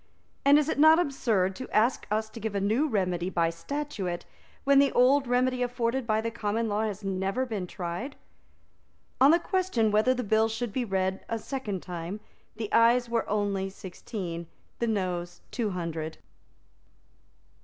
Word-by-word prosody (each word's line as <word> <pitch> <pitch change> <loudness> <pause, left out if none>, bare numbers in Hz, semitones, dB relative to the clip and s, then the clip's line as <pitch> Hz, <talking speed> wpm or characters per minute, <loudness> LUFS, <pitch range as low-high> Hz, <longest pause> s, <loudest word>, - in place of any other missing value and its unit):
And 280 +1 +7
is 300 -1 +2
it 315 - -1
not 315 +2 +8
absurd 225 - +1
to 255 - -7
ask 230 +4 +2
us 215 +1 0
to 230 - -9
give 220 -1 -4
a - - +1
new 220 +10 +2
remedy 180 - 0
by 165 -3 +1
statute, 190 - -4 0.4
when 280 0 +5
the 280 -1 +4
old 265 +2 +4
remedy 250 +1 +1
afforded 245 0 -1
by 215 -1 +2
the 230 +1 -3
common 225 0 -1
law 210 0 0
has 210 -1 -4
never 195 +6 -1
been 210 -7 -4
tried?" 180 +11 -5 1.1
On 270 - +8
the 330 - +7
question 350 - 0
whether 215 +5 +3
the 250 - -2
bill 220 +1 +2
should 220 -1 -3
be 250 0 -1
read 190 -2 -1
a 230 - -1
second 220 -6 -4
time, 175 +3 -5 0.4
the 215 -1 -5
Ayes 235 +1 +4
were 230 -1 -1
only 200 -2 0
sixteen, 180 -3 -6 0.3
the 235 - 0
Noes 180 -5 -2
two 230 -4 -1
hundred. 165 -3 -4
220 Hz, 165 wpm, -28 LUFS, 190-250 Hz, 1.1 s, not